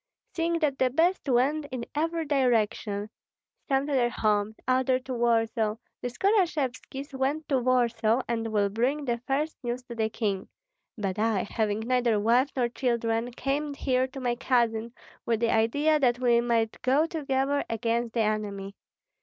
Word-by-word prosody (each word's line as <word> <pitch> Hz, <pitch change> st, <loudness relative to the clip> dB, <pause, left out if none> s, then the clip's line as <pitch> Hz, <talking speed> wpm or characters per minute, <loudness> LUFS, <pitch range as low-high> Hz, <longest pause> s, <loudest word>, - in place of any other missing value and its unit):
Seeing 335 Hz, 0 st, 0 dB
that 285 Hz, -3 st, 0 dB
the 260 Hz, -, +3 dB
best 330 Hz, +4 st, +1 dB
went 275 Hz, +5 st, +2 dB
in 255 Hz, -3 st, -5 dB
every 325 Hz, +2 st, -1 dB
direction, 220 Hz, -6 st, 0 dB, 0.6 s
some 270 Hz, -1 st, +1 dB
to 290 Hz, -, -3 dB
their 245 Hz, -3 st, +3 dB
homes, 215 Hz, -2 st, 0 dB
others 255 Hz, 0 st, +2 dB
to 260 Hz, 0 st, -5 dB
Warsaw, 225 Hz, -2 st, +1 dB, 0.3 s
the -, -, -2 dB
Skorashevskis 290 Hz, -, -1 dB
went 275 Hz, +4 st, -1 dB
to 270 Hz, -3 st, +3 dB
Warsaw, 240 Hz, -1 st, +2 dB
and 230 Hz, -1 st, -1 dB
will 205 Hz, -2 st, +2 dB
bring 255 Hz, +8 st, 0 dB
the 240 Hz, -2 st, -1 dB
first 295 Hz, +4 st, -1 dB
news 240 Hz, +1 st, -3 dB
to 245 Hz, -1 st, -9 dB
the 220 Hz, -1 st, 0 dB
king; 200 Hz, -4 st, -2 dB, 0.5 s
but 200 Hz, -1 st, -3 dB
I, 220 Hz, -3 st, +1 dB
having 215 Hz, -1 st, -1 dB
neither 240 Hz, -2 st, +1 dB
wife 240 Hz, +6 st, +3 dB
nor 250 Hz, -3 st, +2 dB
children, 235 Hz, -1 st, -1 dB
came 285 Hz, +3 st, -2 dB
here 260 Hz, -2 st, +1 dB
to 265 Hz, +1 st, -9 dB
my 245 Hz, -2 st, 0 dB
cousin, 235 Hz, -2 st, 0 dB, 0.4 s
with 230 Hz, -2 st, +1 dB
the 230 Hz, 0 st, +2 dB
idea 290 Hz, +8 st, +2 dB
that 245 Hz, -3 st, +3 dB
we 240 Hz, -2 st, +3 dB
might 230 Hz, -2 st, 0 dB
go 270 Hz, +5 st, +3 dB
together 285 Hz, -3 st, 0 dB
against 230 Hz, +1 st, -1 dB
the 230 Hz, -, +2 dB
enemy. 205 Hz, -2 st, -2 dB
245 Hz, 160 wpm, -27 LUFS, 225-275 Hz, 0.6 s, the